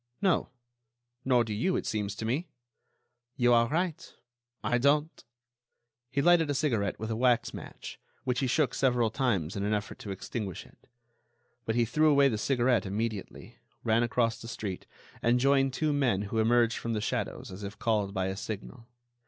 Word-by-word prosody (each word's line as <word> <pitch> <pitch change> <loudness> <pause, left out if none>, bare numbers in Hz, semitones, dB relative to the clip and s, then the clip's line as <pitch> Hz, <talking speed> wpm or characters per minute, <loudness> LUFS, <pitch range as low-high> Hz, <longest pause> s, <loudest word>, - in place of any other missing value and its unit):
"No. 190 -4 +2 0.7
Nor 125 -2 +3
do 110 -2 -4
you, 180 - 0
it - - -2
seems 105 -2 -2
to 110 - -5
me." 140 +10 -1 0.9
"You 120 -1 +4
are 115 0 +5
right, 165 +2 -2 0.5
I 120 - +1
don't." 145 +4 +1 0.9
He 140 - 0
lighted 175 -2 +5
a 145 - 0
cigarette 115 -10 0
with 110 +1 -4
a - - 0
wax 120 0 +2
match, - - -9 0.2
which 125 -1 0
he 135 - 0
shook 135 0 +1
several 120 -4 +2
times 100 - 0
in 100 - -2
an 105 +1 +1
effort 105 +1 -5
to 105 - -8
extinguish 95 0 -5
it. - - -22 0.8
But 110 - -1
he 120 -1 +3
threw 155 +7 +3
away 140 -1 +5
the 110 -4 -2
cigarette 125 -3 +2
immediately, 105 0 -4 0.2
ran 115 0 +3
across 115 -1 0
the 115 - -8
street, 100 -5 -5 0.3
and 120 +1 +3
joined 135 0 +3
two 150 +3 0
men 125 -9 +1
who 110 +2 -2
emerged 115 +1 +3
from 115 - -3
the 110 - 0
shadows - - -3
as 95 +3 -8
if 100 +1 -6
called 105 -4 0
by 95 -2 -1
a 95 0 -2
signal. 110 +4 -7
120 Hz, 180 wpm, -29 LUFS, 105-135 Hz, 0.9 s, are